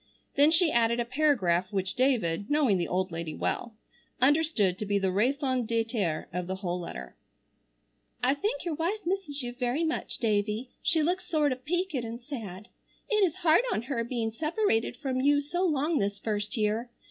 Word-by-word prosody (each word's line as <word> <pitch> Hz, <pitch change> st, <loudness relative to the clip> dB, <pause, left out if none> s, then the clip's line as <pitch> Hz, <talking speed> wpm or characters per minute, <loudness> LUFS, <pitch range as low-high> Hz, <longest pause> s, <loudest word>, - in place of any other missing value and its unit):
Then 285 Hz, +2 st, +5 dB
she 325 Hz, 0 st, +4 dB
added 235 Hz, 0 st, +2 dB
a 240 Hz, -, 0 dB
paragraph 235 Hz, -, +1 dB
which 190 Hz, -2 st, -1 dB
David, 215 Hz, -8 st, +1 dB
knowing 280 Hz, -10 st, +3 dB
the 170 Hz, -, -1 dB
old 185 Hz, 0 st, -1 dB
lady 165 Hz, -1 st, -4 dB
well, 235 Hz, -2 st, -2 dB, 0.4 s
understood 265 Hz, -, +3 dB
to 210 Hz, -, -2 dB
be 205 Hz, 0 st, +2 dB
the 190 Hz, -1 st, +1 dB
raison 255 Hz, +5 st, +1 dB
d'être 225 Hz, -7 st, -1 dB
of 180 Hz, 0 st, -3 dB
the 190 Hz, -, -2 dB
whole 180 Hz, -2 st, -3 dB
letter: 65 Hz, -, -7 dB, 1.1 s
"I 255 Hz, +2 st, +4 dB
think 420 Hz, +12 st, -2 dB
your 340 Hz, -, -1 dB
wife 345 Hz, +7 st, -2 dB
misses 340 Hz, -7 st, -2 dB
you 245 Hz, 0 st, -4 dB
very 250 Hz, +5 st, -1 dB
much, 320 Hz, 0 st, -1 dB
Davie, 215 Hz, +2 st, 0 dB
she 320 Hz, -2 st, +2 dB
looks 360 Hz, +4 st, -1 dB
sort 300 Hz, -3 st, +2 dB
of 255 Hz, +1 st, -5 dB
peeked 355 Hz, +3 st, -1 dB
and 235 Hz, -3 st, -3 dB
sad. 220 Hz, -7 st, -7 dB, 0.4 s
It 425 Hz, -1 st, +4 dB
is 340 Hz, -5 st, +2 dB
hard 320 Hz, +4 st, +6 dB
on 220 Hz, -, -1 dB
her 240 Hz, -2 st, -2 dB
being 230 Hz, -2 st, -2 dB
separated 305 Hz, -, 0 dB
from 260 Hz, -3 st, -2 dB
you 285 Hz, +1 st, +4 dB
so 325 Hz, +6 st, -2 dB
long 305 Hz, -2 st, +1 dB
this 200 Hz, 0 st, -1 dB
first 210 Hz, +2 st, -2 dB
year. 220 Hz, +3 st, 0 dB
245 Hz, 180 wpm, -28 LUFS, 205-300 Hz, 1.1 s, hard